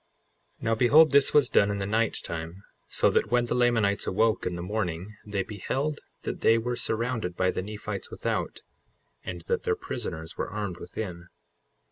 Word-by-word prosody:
55:22 - - -12
Now 115 -1 +2
behold 145 +7 +6
this 140 -1 +5
was 150 -2 +5
done 100 - +4
in 100 - -1
the 100 - -2
night 110 +2 +1
time, 85 +4 -6 0.3
so - - +3
that - - +1
when 120 0 +3
the 120 - -1
Lamanites 115 -5 +2
awoke 110 +3 +2
in 90 - -2
the 85 - -5
morning 95 0 -3
they 100 -2 -1
beheld 135 +9 -2 0.2
that - - -4
they 115 - +5
were 120 +2 -1
surrounded 115 -5 -2
by 90 0 +2
the - - -2
Nephites 105 - -6
without, - - -3 0.6
and - - -5
that 470 -1 0
their 450 -1 +1
prisoners 90 - -5
were - - -3
armed 100 -4 -4
within. 90 -5 -6
110 Hz, 180 wpm, -27 LUFS, 95-120 Hz, 0.6 s, behold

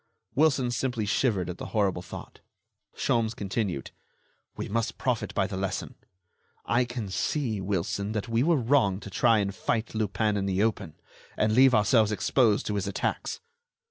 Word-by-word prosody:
Wilson 135 -4 +3
simply 120 -2 -1
shivered 100 -4 +1
at 90 0 -6
the - - -5
horrible 95 -4 +1
thought. - - -10 0.6
Sholmes 115 -1 0
continued: 100 - -3 0.7
"We - - -4
must 115 +2 -2
profit 125 -4 -1
by 100 - +2
the 95 - -5
lesson. 95 0 -3 0.7
I 120 +1 +2
can 120 -3 -5
see, 110 +3 -1
Wilson, 100 +2 -2
that 105 +1 -2
we 115 0 +1
were 165 +5 +4
wrong 120 -7 +2
to 100 - -9
try 115 +3 +4
and 100 -1 0
fight 110 +3 -2
Lupin 110 -1 0
in 100 -1 -1
the 95 +1 +1
open, 105 -8 -1 0.4
and 110 0 +2
leave 130 +2 +6
ourselves 110 +1 +4
exposed 110 0 +2
to 105 - -2
his 100 -2 -1
attacks." 100 - -2
110 Hz, 165 wpm, -27 LUFS, 100-120 Hz, 0.7 s, leave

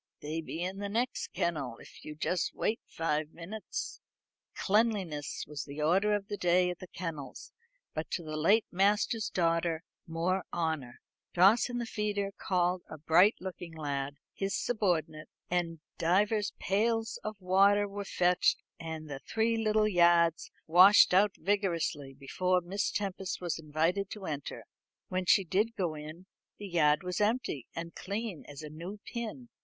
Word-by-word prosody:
They 155 +2 -3
be 165 +1 -5
in 190 +2 -4
the 200 0 -3
next 240 +5 -1
kennel, 145 -9 -2
if - - -14
you'll 150 -1 -8
just 175 +2 -1
wait 225 - 0
five 155 -2 -1
minutes." 200 +6 -6 0.5
Cleanliness 195 -9 0
was 150 -1 -5
the 145 +1 -8
order 195 +6 +3
of 200 -1 -4
the 205 - -4
day 180 0 +3
at 180 - -8
the 185 - -9
kennels, 165 -6 -7 0.4
but 155 - -4
to 170 - -3
do 155 - -7
the - - -3
late 200 +9 +4
master's 205 +4 +2
daughter 165 -1 +1 0.2
more 175 +3 0
honour, 160 -7 -2 0.3
Dawson 220 +7 +5
the 240 - -2
feeder 205 -2 -2
called 180 -1 0
a 155 - -7
bright 170 +8 +5
looking 175 -2 -7
lad, 140 -2 -3 0.2
his 195 +1 -2
subordinate, 175 -9 -1 0.2
and 170 -3 -1 0.2
divers 205 +5 +2
pails 225 +3 0
of 215 -1 -5
water 200 +2 +4
were 200 0 -5
fetched, 180 -2 +2 0.2
and 160 -1 -6
the 140 -2 -6
three 225 +8 0
little 215 -1 +2
yards 170 -3 +4 0.2
washed 185 +4 +7
out 195 +1 +4
vigorously 170 -7 -1
before 180 +7 0
Miss 185 +4 -2
Tempest 195 -2 -3
was 175 -2 -3
invited 165 +6 0
to 205 -3 -7
enter. 145 -4 -5 0.5
When 185 -1 -2
she 195 - +6
did 210 +6 0
go 175 -5 -1
in, 155 +4 -9 0.3
the 205 - -7
yard 150 -3 +3
was 180 +2 -2
empty 210 - 0
and 170 0 -5
clean 200 -2 -4
as 145 +1 -9
a 150 - -6
new 175 +7 -7
pin. 235 +1 -6
180 Hz, 160 wpm, -31 LUFS, 160-205 Hz, 0.5 s, washed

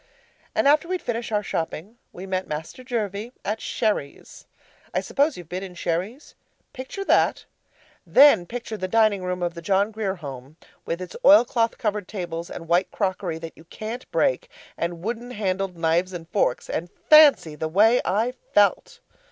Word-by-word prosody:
And - - +2
after 300 +3 +4
we'd 365 0 -2
finished 235 -1 -3
our 210 -1 0
shopping, 175 +5 -4
we 180 - -9
met 190 -1 -2
Master 160 +11 -6
Jervie 225 -2 -3
at 215 +2 -2
Sherry's. 205 -10 -3 0.5
I - - +3
suppose 285 0 0
you've 175 -3 -10
been 180 +3 -5
in 190 -2 -8
Sherry's? 180 - -3 0.4
Picture 265 +10 -6
that, - - +2 0.6
then 265 -11 +6
picture 235 -2 -6
the 185 - -3
dining 215 -2 +2
room 180 0 -3
of 175 -1 -1
the 170 - -8
John 200 +4 +1
Grier 210 -3 -2
Home 140 -3 -9 0.3
with 170 +2 -3
its 180 - -10
oilcloth 240 -5 +5
covered 210 -3 -2
tables, 175 -4 -5
and 165 - -8
white 175 +3 +2
crockery 185 -4 -2
that 165 -1 -9
you 160 - -17
CAN'T 220 +8 -7
break, - - 0 0.3
and 170 0 -4
wooden 235 +3 -4
handled 195 -5 -2
knives 170 +3 +1
and 165 -2 -7
forks; 205 - 0
and 175 +2 -3 0.2
fancy 300 - +7
the 155 +1 -3
way 215 +9 +4
I 225 +6 0 0.2
felt! 460 - +2
195 Hz, 170 wpm, -24 LUFS, 175-235 Hz, 0.6 s, fancy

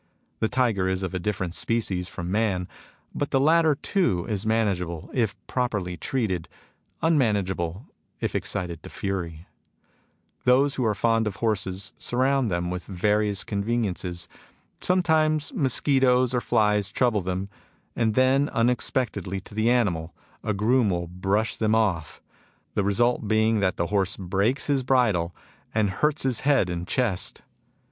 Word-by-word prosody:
The 110 - +1
tiger 115 -7 +1
is 95 0 -1
of 95 - -3
a 95 - -1
different 95 -2 -2
species 95 -5 -1
from 90 -3 -5
man; 100 -4 0 0.5
but 145 - -2
the 135 - +2
latter 160 +1 +4
too 135 - 0
is 105 -1 -2
manageable 95 -7 -1
if 110 -5 0
properly 105 -8 -2
treated, 95 -6 -2 0.5
immanageable 105 - +1 0.3
if - - -2
excited 85 -5 -3
to - - -10
fury. 85 -4 -4 0.5
'' - - -41
Those 135 +3 +4
who 130 -4 -1
are 110 -1 +1
fond 115 0 +2
of 100 - -3
horses 100 -3 -2
surround 130 0 +1
them 90 -1 -1
with 90 -2 -5
various 105 +1 0
conveniences. 100 -5 -2 0.5
Sometimes 160 - +2
mos 140 - +1
quitoes 130 -3 +3
or 125 - +1
flies 105 -4 +2
trouble 120 -4 +1
them; 95 +1 -3 0.5
and 110 -2 +1
then, 135 +2 +3
unex 120 +1 +2
pectedly 100 -7 -2
to - - -14
the 110 +2 +1
animal, 90 -9 +1 0.3
a 105 -2 -1
groom 115 +2 +3
will 85 -2 -1
brush 95 +5 -1
them 110 0 +2
off, 95 -8 -1 0.5
the 105 - +1
result 115 +3 +1
being 110 +1 +3
that 95 -2 0
the 85 - 0
horse 100 -1 +1
breaks 100 +8 0
his 140 -2 +1
bridle, 110 -10 +1 0.4
and 105 -3 +2
hurts 150 0 +2
his 130 -4 +1
head 135 -10 +2
and 90 0 -4
chest. 115 -8 0
105 Hz, 150 wpm, -25 LUFS, 95-125 Hz, 0.5 s, latter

